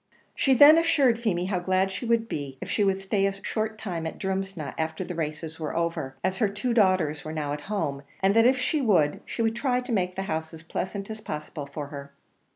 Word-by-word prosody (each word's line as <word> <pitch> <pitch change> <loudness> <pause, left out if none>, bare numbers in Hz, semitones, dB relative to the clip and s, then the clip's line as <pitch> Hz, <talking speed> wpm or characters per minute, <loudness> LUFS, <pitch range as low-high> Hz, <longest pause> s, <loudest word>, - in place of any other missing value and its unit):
She 270 -1 +3
then 295 +5 +9
assured 280 -8 +3
Feemy 185 -7 0
how 185 -1 0
glad 185 +2 +1
she 190 +6 -5
would 230 -1 +2
be 140 -8 -5
if - - -6
she 210 - +2
would 195 -1 +2
stay 195 0 +1
a 195 - -1
short 215 +2 -3
time 170 -6 -4
at - - -6
Drumsna, 190 -7 -3
after 160 +2 -2
the 180 - -5
races 160 0 -4
were 155 0 -3
over, 170 -6 -2
as 185 +1 0
her 215 -4 +3
two 210 +5 -2
daughters 185 - +2
were 155 - -5
now 150 -2 -2
at 145 - -5
home, 155 -10 -1 0.2
and 195 +2 +3
that 225 +1 +6
if 260 +1 +4
she 280 +4 0
would, 175 - +2
she 230 - -2
would 225 0 +1
try 250 0 +1
to 250 0 -6
make 185 -4 0
the 195 - -2
house 160 -2 -3
as 160 - -12
pleasant 195 +5 -4
as 215 0 -7
possible 150 -5 -6
for 140 0 -6
her. 140 -1 -8
190 Hz, 235 wpm, -26 LUFS, 160-220 Hz, 0.2 s, then